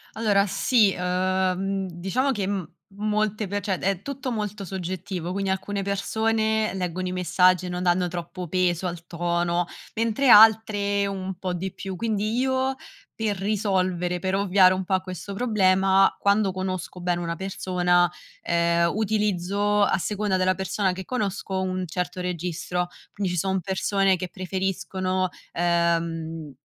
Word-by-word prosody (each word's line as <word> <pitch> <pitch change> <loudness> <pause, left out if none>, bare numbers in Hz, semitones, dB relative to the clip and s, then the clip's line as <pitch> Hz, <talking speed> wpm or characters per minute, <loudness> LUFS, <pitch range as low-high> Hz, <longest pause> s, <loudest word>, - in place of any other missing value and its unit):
Allora 205 -3 +3
sì, 210 +1 +3
ehm, 185 +1 0
diciamo 195 +11 -1
che 205 -5 -2
m 195 -4 -3 0.3
molte 215 0 0
pe 205 +2 -2
cioè, 190 -2 -1
è 195 -1 -1
tutto 275 -2 -4
molto 210 -2 -4
soggettivo, 185 -1 -4
quindi 195 +1 -2
alcune 200 +1 -2
persone 220 +2 0
leggono 185 -1 -3
i 180 - -3
messaggi 180 0 +3
e - - -4
non 180 0 -3
danno 180 0 +2
troppo 175 0 -6
peso 180 0 +1
al 170 -1 -6
tono, 175 0 0 0.3
mentre 230 +4 +1
altre 210 -2 +6
un 190 -1 -4
po' 185 0 -3
di 185 +1 -4
più, 190 -1 -6
quindi 215 +2 -1
io 260 0 +1 0.4
per 215 -3 -1
risolvere, 185 -3 0
per 190 +2 -1
ovviare 190 -1 +5
un 185 0 -2
po' 190 - -3
a 185 - +3
questo 185 +2 -7
problema 195 -3 +3
quando 200 0 +2
conosco 185 -1 -4
bene 175 0 -1
una 170 -1 -3
persona, 180 -2 +1 0.3
ehm, 170 0 +2
utilizzo, 205 -1 +1
a 195 - +2
seconda 205 +2 -1
della 185 0 +2
persona 190 +1 0
che 185 +1 -6
conosco, 200 -5 -2
un 185 0 -2
certo 180 +2 -3
registro. 180 0 -2 0.3
Quindi 195 -3 -2
ci - - -2
son 190 +2 0
persone 195 +1 +1
che 180 +1 -4
preferiscono, 185 0 -2 0.2
ehm, 165 -2 0
190 Hz, 150 wpm, -25 LUFS, 180-205 Hz, 0.4 s, altre